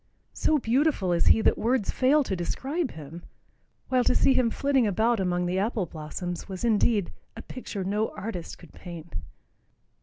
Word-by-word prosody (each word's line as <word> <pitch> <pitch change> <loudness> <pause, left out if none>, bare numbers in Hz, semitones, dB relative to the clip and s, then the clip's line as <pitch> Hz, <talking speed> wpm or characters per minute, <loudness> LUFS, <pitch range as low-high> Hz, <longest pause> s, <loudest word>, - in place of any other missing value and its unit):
So 310 - +2
beautiful 250 - +1
is 170 - +2
he 225 - +6
that - - +2
words 235 -3 +1
fail 285 +3 +3
to 195 - -2
describe 270 - -2
him, 160 +2 -9 0.7
while 255 -1 +3
to - - +3
see 270 - +4
him 255 -3 +3
flitting 270 -1 +1
about 220 +3 +2
among 180 -1 0
the 180 +2 0
apple 210 -1 0
blossoms 170 +4 -6
was 190 +4 -4
indeed 215 -3 +2 0.3
"a 225 - -7
picture 210 -6 -6
no 210 +4 0
artist 195 -4 -5
could 170 - -16
paint." 170 -2 -10
210 Hz, 170 wpm, -27 LUFS, 180-255 Hz, 0.7 s, he